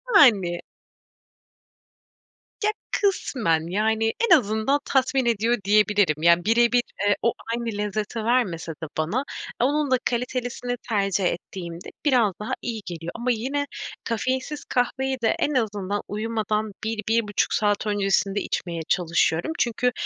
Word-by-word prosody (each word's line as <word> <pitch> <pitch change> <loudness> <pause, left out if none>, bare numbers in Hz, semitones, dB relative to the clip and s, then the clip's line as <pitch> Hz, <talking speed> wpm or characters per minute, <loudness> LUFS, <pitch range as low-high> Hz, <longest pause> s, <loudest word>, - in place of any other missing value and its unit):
Yani. 195 - +5 2.0
Ya, 420 - +3 0.2
kısmen 220 - +1
yani 220 +2 +1 0.2
en 340 - +11
azından 220 +3 +1
tatmin 265 -1 +2
ediyor 235 +1 +2
diyebilirim. 205 -6 +3
Ya 170 0 +5
birebir, 235 +2 +4 0.3
eee, 205 - +4
o 235 - +2 0.2
aynı 230 -2 -2
lezzeti 210 +2 -2
vermese 210 -9 0
de 160 0 -7
bana 200 - 0 0.4
onun 290 +2 +1
da 255 - +5
kalitelisini 245 0 -2
tercih 200 -3 +1
ettiğimde 175 0 -4 0.2
biraz 240 -8 +4
daha 215 +5 -4
iyi 230 -3 -4
geliyor. 170 -1 -6
Ama 240 +2 0
yine 265 +5 -1 0.4
kafeinsiz 255 +5 -2
kahveyi 265 +1 0
de 225 - +2
en 295 - +1
azından 205 -5 -1
uyumadan 215 0 -2
1-1,5 220 -1 0
saat 210 0 +1
öncesinde 200 0 +1
içmeye 170 -2 -3
çalışıyorum. 170 - +1
Çünkü 245 +1 +1
220 Hz, 125 wpm, -24 LUFS, 195-245 Hz, 2.0 s, en